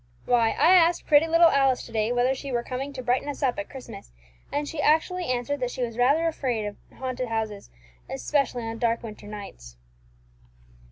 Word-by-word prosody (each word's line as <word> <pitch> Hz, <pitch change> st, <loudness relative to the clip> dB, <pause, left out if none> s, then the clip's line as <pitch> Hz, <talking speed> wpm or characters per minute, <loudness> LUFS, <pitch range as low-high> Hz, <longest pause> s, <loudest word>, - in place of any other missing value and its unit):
Why, 230 Hz, -2 st, +3 dB
I 325 Hz, +6 st, +6 dB
asked 345 Hz, -1 st, +4 dB
pretty 300 Hz, +2 st, +5 dB
little 330 Hz, +1 st, +6 dB
Alice 270 Hz, -2 st, +2 dB
to -, -, -12 dB
day 220 Hz, 0 st, 0 dB
whether 245 Hz, +2 st, +2 dB
she 270 Hz, +1 st, -6 dB
were 240 Hz, -1 st, -1 dB
coming 265 Hz, +3 st, -4 dB
to 255 Hz, -1 st, -6 dB
brighten 250 Hz, +4 st, 0 dB
us 290 Hz, +1 st, -5 dB
up 260 Hz, +2 st, +1 dB
at 300 Hz, -, -5 dB
Christmas, 255 Hz, -, -10 dB, 0.4 s
and 290 Hz, 0 st, -2 dB
she 305 Hz, -1 st, -4 dB
actually 335 Hz, +5 st, +2 dB
answered 255 Hz, +2 st, -2 dB
that 250 Hz, -1 st, -1 dB
she 250 Hz, -, -4 dB
was 230 Hz, -2 st, -4 dB
rather 280 Hz, +7 st, +3 dB
afraid 250 Hz, -9 st, -2 dB
of 205 Hz, 0 st, -5 dB, 0.2 s
haunted 255 Hz, -1 st, -3 dB
houses, 220 Hz, -2 st, -3 dB, 0.4 s
especially 250 Hz, -, -1 dB
on 225 Hz, 0 st, -5 dB
dark 235 Hz, -1 st, 0 dB
winter 210 Hz, -2 st, -9 dB
nights." -, -, -10 dB
255 Hz, 190 wpm, -26 LUFS, 230-290 Hz, 0.4 s, I